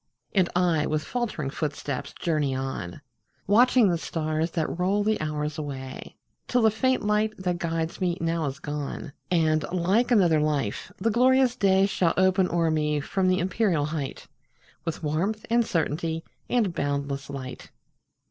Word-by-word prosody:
And 185 -3 +3
I, 170 -4 +2
with 155 0 -1
faltering 210 - -3
footsteps, 145 -3 -3
journey 150 -5 0
on, 130 -6 -4 0.4
Watching 235 +1 +5
the 170 -2 0
stars 155 0 -1
that 165 0 -2
roll 195 +3 +2
the 215 -3 +1
hours 150 0 -2
away, 135 -3 -7 0.3
Till 245 -2 +2
the 220 - +5
faint 260 +4 +1
light 210 +1 +1
that 180 -2 -2
guides 165 +1 -2
me 175 -1 +1
now 165 -1 0
is 135 +1 -4
gone, 145 -1 -5 0.2
And, 160 -3 +2
like 185 +7 +2
another 180 -10 +4
life, 145 -8 -1
the 230 - +1
glorious 255 +2 +4
day 195 -4 +4
Shall 180 -4 +1
open 185 0 +3
o'er 165 -1 +1
me 150 -1 +1
from 185 +6 0
the 185 0 +3
empyreal 180 -5 +1
height, 150 -4 -4 0.6
With 165 -1 -4
warmth, 190 +9 -1
and 235 0 +4
certainty, 165 -3 -1 0.3
and 220 -8 +1
boundless 140 -2 -2
light. 130 -2 -7
165 Hz, 155 wpm, -26 LUFS, 150-200 Hz, 0.6 s, Watching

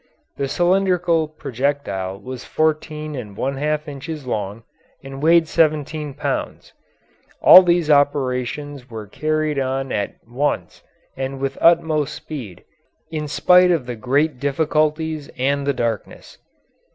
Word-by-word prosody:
The 140 - -1
cylindrical 175 0 +2
projectile 130 -10 -3
was 130 +2 -8
fourteen 155 -1 -1
and 105 -7 -7
one 135 +1 -2
half 150 +2 -1
inches 145 +1 -7
long 105 -2 -4 0.4
and 135 0 -8
weighed 165 +1 +5
seventeen 155 -2 0
pounds. - - -4 0.7
All 185 - +10
these 175 -3 +2
operations 140 -1 0
were 110 -2 -7
carried 155 +5 -1
on 135 0 -2
at 100 -1 -2
once 135 +5 -2 0.3
and 135 0 -4
with 135 0 -2
utmost 155 -3 +3
speed 120 - -8 0.5
in 155 -2 -3
spite 180 +5 +5
of 165 -7 +1
the 125 -1 -5
great 135 +4 0
difficulties 155 +2 0
and 140 +2 0
the - - +4
darkness. 115 -4 -4
145 Hz, 125 wpm, -21 LUFS, 130-155 Hz, 0.7 s, All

